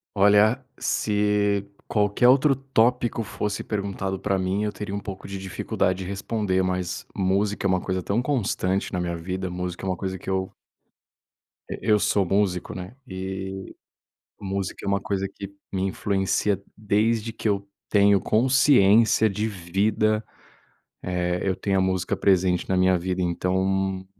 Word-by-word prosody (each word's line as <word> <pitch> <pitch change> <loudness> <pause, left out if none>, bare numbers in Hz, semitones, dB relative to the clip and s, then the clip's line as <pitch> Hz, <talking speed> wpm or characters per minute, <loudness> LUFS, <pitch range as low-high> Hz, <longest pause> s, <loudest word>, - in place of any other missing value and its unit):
Olha, 105 +5 +4 0.2
se 105 -1 +1 0.2
qualquer 105 +3 +2
outro 135 +2 +5
tópico 125 -3 +1
fosse 105 -1 -3
perguntado 100 -2 -3
pra 95 -1 0
mim, 95 +3 0
eu 105 - -1
teria 100 0 -6
um 100 - -2
pouco 95 -1 -8
de 100 - -5
dificuldade 95 0 -1
de 95 - -5
responder, 100 -1 -1
mas, 90 -1 -2
música 100 +1 +1
é - - 0
uma 95 0 +2
coisa 95 -1 -2
tão 100 +6 0
constante 100 -8 -1
na 90 - -2
minha 85 -1 -2
vida. 95 +2 -4
Música 90 +1 -5
é - - -2
uma 95 - 0
coisa 95 -1 -4
que 95 - -8
eu 95 0 -1 1.2
E - - -4
eu 105 -2 +3
sou 100 -1 +2
músico, 95 -1 0
né, 95 +6 -8
e 95 0 -6 0.6
música 95 -1 -4
é - - -4
uma 100 0 +2
coisa 95 -1 -2
que 100 0 -9 0.2
me 95 -1 -1
influencia 95 0 0 0.2
desde 110 +2 +1
que 110 - -4
eu 100 -1 0 0.2
tenho 100 -1 +5
consciência 110 -2 +4
de 105 +3 -2
vida. 105 +3 0 0.8
Eh, 90 0 -1
eu 95 -1 0
tenho 95 +1 0
a - - +3
música 95 -1 0
presente 95 -2 +2
na 95 - +1
minha 95 0 +4
vida. 90 +1 -2
Então, 95 +2 0
95 Hz, 155 wpm, -24 LUFS, 95-105 Hz, 1.2 s, outro